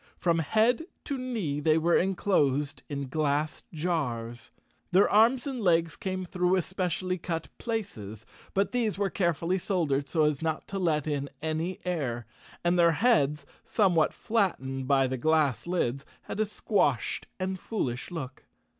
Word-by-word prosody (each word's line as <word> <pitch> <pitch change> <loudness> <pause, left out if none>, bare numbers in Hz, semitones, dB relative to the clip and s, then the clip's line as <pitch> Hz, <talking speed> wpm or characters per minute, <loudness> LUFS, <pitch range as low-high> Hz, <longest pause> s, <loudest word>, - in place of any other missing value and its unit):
From 170 -2 +2
head 225 - +2 0.2
to 285 - -3
knee 225 - -2
they 155 +1 +3
were 170 +2 +3
enclosed 150 -7 +1
in 140 -2 -3
glass 150 +1 0
jars. 130 -8 -2 0.4
Their 190 +3 +5
arms 230 +4 +4
and 265 -4 -3
legs 165 -4 +2
came 185 -1 -3
through 180 +1 +1
especially 185 0 -1
cut 165 -1 -4
places, 110 - -4 0.3
but 195 +1 +2
these 230 -5 0
were 200 -2 0
carefully 170 0 0
soldered 150 -7 0
so 160 -3 +2
as 150 -2 +1
not 160 -1 -2
to 195 - -3
let 155 -5 +1
in 140 -2 -2
any 160 +4 -2
air. 130 -10 -2 0.4
And 175 +1 +2
their 170 -1 +6
heads, 155 - +2 0.2
somewhat 180 -7 +3
flattened 135 - -1
by 135 -1 +4
the 130 0 -2
glass 155 0 +2
lids, 140 -7 0 0.2
had - - -6
a 215 - +2
squashed 170 - 0
and 190 0 -2
foolish 125 - -3
look. 145 -6 -7
165 Hz, 150 wpm, -28 LUFS, 145-190 Hz, 0.4 s, their